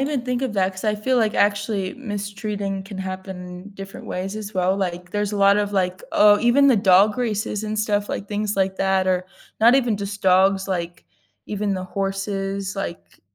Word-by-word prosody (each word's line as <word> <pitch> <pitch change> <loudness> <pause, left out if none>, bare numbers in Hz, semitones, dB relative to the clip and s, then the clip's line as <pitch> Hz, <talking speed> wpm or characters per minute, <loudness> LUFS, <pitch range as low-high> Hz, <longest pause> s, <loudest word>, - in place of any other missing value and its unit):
even 275 -2 -1
think 250 0 -1
of 260 - -1
that 190 -1 +1
‘cause 190 - -8
I 210 - +2
feel, 255 +5 0
like, 220 -3 +2
actually 205 -2 0
mistreating 205 -4 -4
can 195 0 -9
happen 185 0 -7
different 195 0 -9
ways 190 +3 -4
as 215 -1 -6
well, 185 0 +1
like, 180 -2 -3
there's 205 +1 -1
a - - -2
lot 200 0 +5
of, 205 0 0
like 185 -1 0
oh, 210 0 +6
even 240 +4 +4
the 255 - +5
dog 195 +1 +5
races 215 -3 -2
and 215 0 -3
stuff, 205 -1 0
like, 195 - -4
things 210 0 -2
like 190 0 +1
that, 190 -1 +1
or 185 -1 +1 0.4
not 235 +3 +7
even 245 -5 +2
just 200 0 -6
dogs, 190 +1 +3
like, 175 - -3 0.4
even 205 -1 -1
the 185 -1 -4
horses, 195 0 -3
like, 195 -3 -6
200 Hz, 195 wpm, -22 LUFS, 190-210 Hz, 0.4 s, not